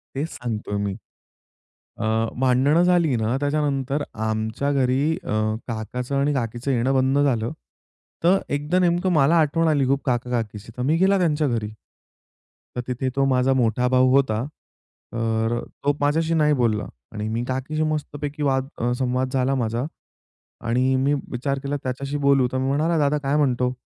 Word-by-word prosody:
तेच 145 Hz, +4 st, -2 dB
सांगतोय 110 Hz, -4 st, -4 dB
मी. 100 Hz, -1 st, -2 dB, 1.0 s
अ, 110 Hz, -, -3 dB, 0.3 s
भांडणं 135 Hz, +6 st, +3 dB
झाली 175 Hz, -6 st, +3 dB
ना 115 Hz, +2 st, 0 dB
त्याच्यानंतर 145 Hz, -1 st, 0 dB
आमच्या 110 Hz, +5 st, -2 dB
घरी 135 Hz, +3 st, +1 dB
अ, -, -, -14 dB, 0.4 s
काकाचं 120 Hz, +3 st, -4 dB
आणि 140 Hz, +1 st, +2 dB
काकीचं 120 Hz, +1 st, -2 dB
येणं 125 Hz, +2 st, +1 dB
बंद 130 Hz, +1 st, +2 dB
झालं. 120 Hz, -5 st, +1 dB, 0.7 s
तर 180 Hz, +3 st, +5 dB, 0.2 s
एकदा 150 Hz, +5 st, +1 dB
नेमकं 175 Hz, +1 st, +2 dB
मला 155 Hz, +2 st, +4 dB
आठवण 160 Hz, +2 st, +2 dB
आली 145 Hz, -4 st, +2 dB
खूप 135 Hz, 0 st, +1 dB
काका-काकीची 115 Hz, -4 st, -2 dB
तर -, -, -3 dB
मी 145 Hz, +5 st, +2 dB
गेला 195 Hz, +2 st, +4 dB
त्यांच्या 155 Hz, -4 st, +1 dB
घरी. 115 Hz, -4 st, -1 dB, 1.1 s
तर 125 Hz, -, -1 dB
तिथे 130 Hz, +1 st, -2 dB
तो 135 Hz, 0 st, +2 dB
माझा 130 Hz, 0 st, +2 dB
मोठा 125 Hz, -1 st, +1 dB
भाऊ 130 Hz, 0 st, +4 dB
होता. 120 Hz, -5 st, +2 dB, 0.7 s
तर 115 Hz, 0 st, 0 dB
अ, -, -, -4 dB, 0.2 s
तो 145 Hz, -, +3 dB
माझ्याशी 160 Hz, +3 st, +1 dB
नाही 150 Hz, -2 st, +3 dB
बोलला. 115 Hz, -6 st, 0 dB, 0.3 s
आणि 105 Hz, 0 st, -4 dB
मी 115 Hz, +2 st, -2 dB
काकीशी 135 Hz, +4 st, -2 dB
मस्त 150 Hz, -1 st, -4 dB
पैकी 145 Hz, 0 st, -3 dB
वाद 135 Hz, -1 st, +1 dB, 0.3 s
संवाद 130 Hz, 0 st, 0 dB
झाला 135 Hz, +1 st, +1 dB
माझा. 120 Hz, 0 st, -1 dB, 0.8 s
आणि 130 Hz, +3 st, +2 dB
मी 135 Hz, +2 st, +2 dB, 0.2 s
विचार 135 Hz, +2 st, -2 dB
केला 140 Hz, +1 st, -2 dB
त्याच्याशी 135 Hz, +3 st, -3 dB
बोलू 140 Hz, -3 st, +3 dB
तर 130 Hz, -, -1 dB
मी 130 Hz, 0 st, -1 dB
म्हणाला, 155 Hz, +5 st, +1 dB
"दादा 150 Hz, 0 st, +2 dB
काय 145 Hz, 0 st, -1 dB
म्हणतो? 125 Hz, -3 st, +1 dB
135 Hz, 160 wpm, -23 LUFS, 120-145 Hz, 1.1 s, तर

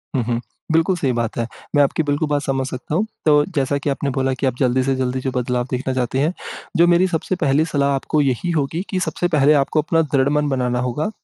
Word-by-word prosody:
हुँ, 125 Hz, -, +1 dB
हुँ। 120 Hz, 0 st, -1 dB, 0.3 s
बिल्कुल 165 Hz, +3 st, +3 dB
सही 140 Hz, -7 st, 0 dB
बात 120 Hz, -1 st, -2 dB
है। 115 Hz, -, 0 dB, 0.3 s
मैं 145 Hz, -, +6 dB
आपकी 140 Hz, +3 st, 0 dB
बिल्कुल 145 Hz, +1 st, 0 dB
बात 145 Hz, -1 st, +1 dB
समझ 135 Hz, -2 st, -1 dB
सकता 130 Hz, +4 st, -5 dB
हूँ, 205 Hz, +6 st, +2 dB, 0.2 s
तो 150 Hz, -1 st, +5 dB
जैसा 140 Hz, 0 st, +1 dB
कि 145 Hz, 0 st, -3 dB
आपने 140 Hz, +1 st, -1 dB
बोला 135 Hz, 0 st, +1 dB
कि 130 Hz, -, -3 dB
आप 130 Hz, -, -1 dB
जल्दी 130 Hz, -1 st, +2 dB
से 135 Hz, 0 st, +1 dB
जल्दी 130 Hz, 0 st, -1 dB
जो 130 Hz, 0 st, -2 dB
बदलाव 125 Hz, 0 st, -1 dB
देखना 130 Hz, +1 st, -2 dB
चाहते 130 Hz, +1 st, -1 dB
हैं, 155 Hz, +5 st, +1 dB, 0.4 s
जो 170 Hz, -, +5 dB
मेरी 175 Hz, +2 st, +4 dB
सबसे 180 Hz, +1 st, -2 dB
पहली 155 Hz, -2 st, +2 dB
सलाह 140 Hz, -3 st, 0 dB
आपको 150 Hz, +3 st, 0 dB
यही 140 Hz, +5 st, 0 dB
होगी 160 Hz, +2 st, -1 dB
कि 190 Hz, -, -1 dB
सबसे 175 Hz, -1 st, -1 dB
पहले 150 Hz, -2 st, +4 dB
आपको 155 Hz, +2 st, 0 dB
अपना 165 Hz, +2 st, +1 dB
दृढ़ 140 Hz, -3 st, +1 dB
मन 150 Hz, 0 st, +1 dB
बनाना 125 Hz, -2 st, 0 dB
होगा। 125 Hz, -, -1 dB
140 Hz, 240 wpm, -20 LUFS, 130-155 Hz, 0.4 s, मैं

